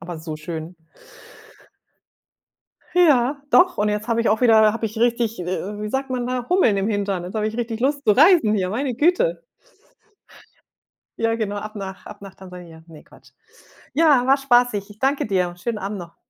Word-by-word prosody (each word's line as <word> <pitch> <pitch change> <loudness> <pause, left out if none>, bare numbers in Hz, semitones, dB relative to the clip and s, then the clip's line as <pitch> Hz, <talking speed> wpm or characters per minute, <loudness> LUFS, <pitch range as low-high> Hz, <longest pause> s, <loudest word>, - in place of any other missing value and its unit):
aber 170 -1 -8
so 160 -1 -7
schön. 160 +2 -7 2.2
Ja, 280 -5 +3
doch. 360 0 +4
Und 210 0 +1
jetzt 210 +2 -3
habe 230 -1 0
ich 230 - +1
auch 215 +2 0
wieder, 220 -3 +5
habe 230 - -3
ich 220 +1 -6
richtig, 230 -2 0
äh, 175 - -5 0.3
wie 210 0 -4
sagt 265 +2 -3
man 250 -1 -3
da, 250 -1 -3
Hummeln 360 - +3
im 195 +2 -1
Hintern? 200 -4 -2
Jetzt 180 +3 -8
habe 215 0 0
ich 220 - -6
richtig 230 -1 -4
Lust 280 +2 -1
zu 215 - +4
reisen 305 - +5
hier, 185 -3 -1
meine 250 +4 -3
Güte. 365 - +1 1.8
Ja, 225 0 +1
ab 215 -1 -5
nach 195 -2 -8
ab 210 -1 -12
nach 195 -1 -11
Tansania, 180 -4 -13
ne 160 -2 -14
Quatsch. - - -21 0.6
Ja, 290 -5 +4
war 270 +2 +4
spaßig. 245 -6 +1
Ich 210 0 -15
danke 270 +3 0
dir. 185 -4 -1
Schönen 230 +4 -4
Abend 205 0 -5
noch. 170 -1 -11
220 Hz, 180 wpm, -21 LUFS, 195-255 Hz, 2.2 s, wieder